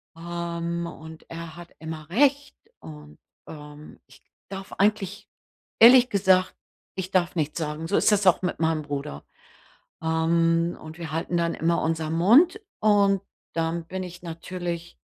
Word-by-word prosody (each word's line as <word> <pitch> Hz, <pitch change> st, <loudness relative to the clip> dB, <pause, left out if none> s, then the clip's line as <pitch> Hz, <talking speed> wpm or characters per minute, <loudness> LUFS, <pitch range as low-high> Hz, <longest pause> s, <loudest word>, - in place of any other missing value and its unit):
Ähm, 170 Hz, 0 st, -4 dB
und 160 Hz, -1 st, -11 dB
er 165 Hz, -1 st, -8 dB
hat 175 Hz, 0 st, -12 dB
immer 160 Hz, -1 st, -7 dB
Recht 280 Hz, +7 st, +2 dB, 0.2 s
und, 150 Hz, -1 st, -12 dB, 0.3 s
ähm, 150 Hz, 0 st, -11 dB
ich 135 Hz, +1 st, -19 dB, 0.3 s
darf 195 Hz, 0 st, -8 dB
eigentlich 205 Hz, -1 st, 0 dB, 0.5 s
ehrlich 245 Hz, +2 st, +8 dB
gesagt, 190 Hz, -3 st, +3 dB, 0.4 s
ich 190 Hz, 0 st, -5 dB
darf 180 Hz, -1 st, +1 dB
nichts 155 Hz, -2 st, -2 dB
sagen, 155 Hz, +1 st, -4 dB
so 200 Hz, -, 0 dB
ist -, -, +4 dB
es 205 Hz, -2 st, +2 dB
auch 180 Hz, -, +5 dB
mit 180 Hz, -1 st, -2 dB
meinem 160 Hz, -1 st, +1 dB
Bruder. 140 Hz, -, -6 dB, 0.8 s
Ähm, 165 Hz, +1 st, +1 dB
und 155 Hz, +1 st, -10 dB
wir 160 Hz, -3 st, -6 dB
halten 165 Hz, +2 st, -2 dB
dann 170 Hz, 0 st, 0 dB
immer 170 Hz, +1 st, +1 dB
unser 160 Hz, -1 st, -1 dB
Mund 265 Hz, -, +5 dB, 0.2 s
und 200 Hz, -2 st, +3 dB, 0.3 s
dann 165 Hz, 0 st, -2 dB
bin 185 Hz, +1 st, -4 dB
ich 175 Hz, -1 st, -9 dB
natürlich 170 Hz, 0 st, -6 dB
170 Hz, 145 wpm, -25 LUFS, 160-190 Hz, 0.8 s, ehrlich